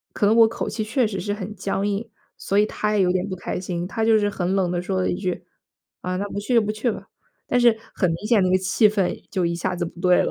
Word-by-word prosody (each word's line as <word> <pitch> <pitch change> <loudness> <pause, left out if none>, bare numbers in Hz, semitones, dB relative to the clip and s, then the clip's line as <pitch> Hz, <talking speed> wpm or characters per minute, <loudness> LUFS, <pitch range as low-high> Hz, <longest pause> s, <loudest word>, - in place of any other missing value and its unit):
可 - - 0
能 210 - +4
我 230 -1 +7
口 225 - -4
气 220 - -3
确 230 +3 +1
实 195 -3 -4
是 205 +3 -2
很 205 0 -6
僵 195 0 -2
硬， 205 +3 -2 0.3
所 200 - -2
以 210 - +5
他 210 0 -2
也 195 - +4
有 180 - +2
点 185 +2 -1
不 185 - -3
开 180 - -4
心。 175 -1 -3
他 220 +4 -2
就 225 0 +5
是 205 -1 +2
很 185 -2 -1
冷 190 -3 +1
地 175 0 -1
说 185 +1 -2
了 - - +1
一 - - -1
句： 180 -2 -3 0.6
“啊， 180 0 -2
那 200 +2 -2
不 200 - -5
去 210 +5 -1
就 230 - +6
不 210 - -2
去 215 +3 -1
吧。” - - -7 0.4
但 245 - +2
是 235 -2 +5 0.2
很 185 - +1
明 170 +6 -4
显 225 -2 +4
那 185 - +2
个 185 - +5
气 190 +3 +3
氛 200 -3 -1
就 185 -2 0
一 170 0 0
下 180 +2 -2
子 175 0 -2
不 170 +1 -9
对 180 -1 +4
了。 - - -1
195 Hz, 315 characters per minute, -23 LUFS, 180-215 Hz, 0.6 s, 我